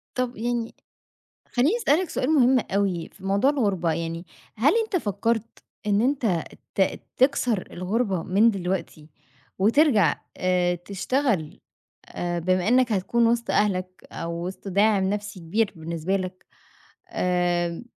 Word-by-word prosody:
طب 250 -1 -1
يعني، 235 0 -2 0.8
خلّيني 280 - +3
أسألك 360 - +1
سؤال 255 - -1
مهم 265 -4 +5
أوي 195 -6 -1
في 190 - -16
موضوع 200 +8 +3
الغربة 200 - 0
يعني، 165 +2 -4 0.3
هل 245 +7 +4
أنت 435 -3 -2
فكّرت، 230 - -1 0.3
إن 205 0 +2
أنت 240 - +1 0.3
ت 190 -1 +1 0.2
تكسر 245 -6 +2
الغربة 190 0 -1
من 200 +6 +4
دلوقتي، 180 -5 -4 0.5
وترجع 225 +3 +4 0.2
آآ 180 -1 +1
تشتغل، 195 - -2 0.5
آآ 175 0 -3
بما 185 +2 +1
إنّك 250 -1 +3
هتكون 230 +4 +2
وسط 235 0 +1
أهلك 185 -3 0
أو 170 +1 -4
وسط 190 +2 -7
داعم 200 +1 +3
نَفْسي 205 -2 -4
كبير 195 +6 0
بالنسبة 165 +3 -2
لك، 185 -1 -6 0.6
آآ، 175 - 0
200 Hz, 125 wpm, -25 LUFS, 180-240 Hz, 0.8 s, مهم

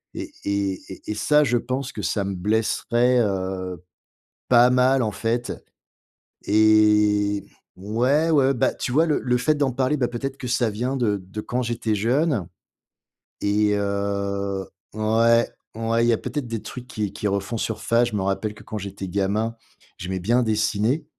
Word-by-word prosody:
et - - -6
et 100 -2 -1
et - - -9
et - - -2
ça 150 +9 +3
je 120 -2 +2
pense 130 +3 -3
que 105 - -5
ça 100 +1 -1
me 100 - -3
blesserait, 115 +5 +1
heu, 95 -3 -3 0.7
pas 120 0 +6
mal 130 +1 +4
en 110 - -1
fait 115 +4 -2 1.0
et 105 -1 +4 0.3
ouais 125 - +1
ouais. 140 -3 +4
Bah, 120 - +1
tu 125 - -4
vois 160 +5 +4
le 150 - +1
le 125 -1 +1
fait 140 +5 +2
d'en 140 -3 +1
parler, 130 +3 +1
bah, 125 -4 +1
peut-être 135 +3 -5
que 130 - -6
ça 120 -2 +1
vient 125 +6 -2
de 110 -5 +1
de 105 +3 -5
quand 125 +3 -2
j'étais 115 -2 -1
jeune 120 - +1 0.9
et 105 0 +2
heu 100 -1 -2 0.3
ouais, 115 +2 +3 0.3
ouais 115 +1 0
il - - +2
y - - +5
a - - +1
peut-être 145 +1 -4
des 115 -2 -4
trucs 125 0 -9
qui 105 -5 -3
qui 105 - -2
refont 100 +3 -2
surface. 115 +2 +1
Je 110 - -5
me 95 - -1
rappelle 100 +2 -1
que - - -14
quand 110 - -6
j'étais 100 0 -6
gamin 100 +4 -1 0.4
j'aimais 95 +1 -4
bien 120 +7 +2
dessiner 110 +6 0
110 Hz, 175 wpm, -23 LUFS, 100-125 Hz, 1.0 s, pas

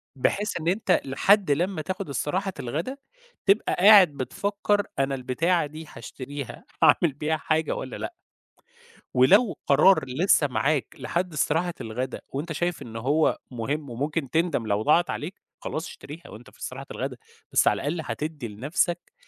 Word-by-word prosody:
بحيث 200 - 0
إن 160 - -5
أنت 185 0 +2
لحد 190 +7 +3
لمّا 175 +3 0
تاخد 185 +1 -5
استراحة 185 +8 -2
الغدا، 160 - -3 0.5
تبقى 200 +2 +3
قاعد 200 0 +8
بتفكّر 200 +9 -1 0.2
أنا 135 0 +1
البتاعة 155 +7 +1
دي 155 +2 -9
هاشتريها 135 +3 -8 0.2
هاعمل 165 -5 +5
بيها 155 +3 -1
حاجة 155 -1 0
والّا 130 - -6
لأ؟ - - -5 1.0
ولو 195 - +5
قرار 150 +3 +5
لِسّه 145 +3 +3
معاك 140 +2 0
لحد 175 0 -2
استراحة 165 +4 0
الغدا 125 +4 -4
وأنت 150 +5 -4
شايف 175 +2 -2
إن 115 -1 -9
هو 145 +7 +2
مهم 140 +5 -3
وممكن 140 +4 -2
تندم 160 -6 0
لو 105 0 +1
ضاعت 160 +8 +3
عليك، 170 +6 -5 0.2
خلاص 160 +2 -4
اشتريها 155 +4 -11
وأنت 110 +3 -12
في - - -23
استراحة - - -6
الغدا، - - -4 0.3
بس - - +4
على - - +5
الأقل 160 +2 -1
هتدّي 150 -5 -4
لنَفسك 150 - -2
155 Hz, 150 wpm, -25 LUFS, 135-180 Hz, 1.0 s, قاعد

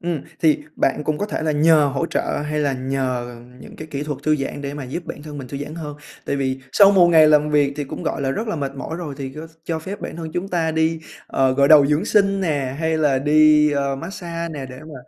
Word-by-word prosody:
Ừm, 170 -4 -2 0.2
thì 155 -2 +4 0.2
bạn 145 +2 0
cũng 155 -1 -1
có 205 - -2
thể 205 - -4
là 155 -1 0
nhờ 155 0 +4
hỗ 135 - 0
trợ - - -1 0.2
hay 150 0 -2
là 140 -2 +1
nhờ 130 -2 -3 0.3
những - - -12
cái 155 - -8
kỹ 140 -1 -3
thuật 150 -2 -4
thư 155 0 +2
giãn 140 0 -4
để 140 0 -5
mà 145 -3 -6
giúp 160 +7 -6
bản 145 - -7
thân 150 -1 -8
mình 130 -2 -8
thư 140 - -6
giãn 145 +2 -6
hơn. 150 -3 -7 0.3
Tại 140 - -1
vì 135 -1 -2
sau 200 -1 +7
1 185 -3 +6
ngày 160 -2 +6
làm 150 0 +4
việc 145 -2 +2
thì 145 - -3
cũng, - - -7
gọi - - -2
là, 135 - 0
rất 220 +10 -3
là 190 - -2
mệt 140 -2 -3
mỏi 160 +4 -5
rồi 160 -5 -6
thì 135 -1 -5
có 155 +2 -8 0.2
cho 165 -1 -2
phép 195 +5 -7
bản - - -6
thân 160 -2 -6
chúng 185 +2 -3
ta 165 -3 0
đi, 160 0 0 0.3
ờ, 130 -1 +1
gội 140 0 +3
đầu 150 -3 +8
dưỡng 150 +6 +1
sinh 195 -2 +2
nè, 140 -6 -1
hay 160 0 0
là 145 -4 +2
đi, 150 +1 +5
ờ, 140 -1 -1
mát 165 +6 -7
xa 170 -3 -5
nè 140 -3 -6
để 130 0 -11
mà 155 0 -11
150 Hz, 270 wpm, -21 LUFS, 140-160 Hz, 0.3 s, đầu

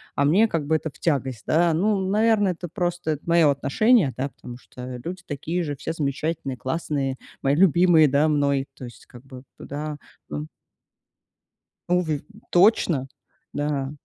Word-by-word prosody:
а 140 - +2
мне 190 +10 +4
как 165 -8 -2
бы 160 - +2
это 160 - -5
в - - -20
тягость, 130 -7 -1
да? 170 +1 +3
Ну, 205 +5 +2
наверное, 210 -1 +3
это 175 +1 -7
просто 175 -3 -2
это 150 -1 -4
моё 170 -3 +5
отношение, 145 - +3
да, 135 +2 -2
потому 120 -2 -11
что 125 -1 -9
люди 180 +3 -6
такие 160 +5 -3
же, 145 -3 -3
все 160 - -4
замечательные, 145 -2 -3
классные, 135 -1 -2 0.3
мои 135 +1 +2
любимые, 175 -2 +5
да, 145 +3 +3
мной. 140 -2 +1
То 130 - -11
есть 120 - -13
как 120 0 -14
бы 130 -2 -11
туда. 150 +1 -6 0.3
М 75 +1 -5 1.4
Новы 170 -5 +1
в - - -20 0.3
точно. 175 - +3 0.5
Да. 145 -2 -2
150 Hz, 160 wpm, -24 LUFS, 135-175 Hz, 1.4 s, моё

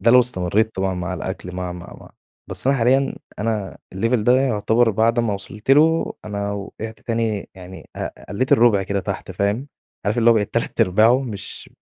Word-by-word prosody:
ده 115 - +4
لو 125 +1 +8
استمريت 110 -1 0
طبعًا 95 0 -1
مع 90 0 -3
الأكل 90 -1 -6
مع، 90 -1 -4
مع، 85 -1 -10
مع. - - -14 0.4
بس - - -1
أنا 135 +1 +4
حاليًا 135 +3 +2 0.2
أنا 105 -3 -2 0.2
الLevel 115 +6 0
ده 125 +3 +4
يعتبر 115 -1 +2
بعد 115 +3 +2
ما 115 -3 0
وصلت 105 +5 -5
له، 160 +4 +4
أنا 100 -1 -3
وقعت 110 +2 -7
تاني 115 -3 -2
يعني 95 0 -12
ق - - -3 0.2
قلّيت 130 +6 0
الرُبع 110 -4 +5
كده 100 +1 -2
تحت 95 -1 -5
فاهم، 100 +8 -1 0.4
عارف 105 +4 0
اللي 115 0 +6
بقيت 105 -3 -1
تلات - - -1
أرباعه 110 +8 +4
مش 110 -7 -6
110 Hz, 180 wpm, -21 LUFS, 95-120 Hz, 0.4 s, لو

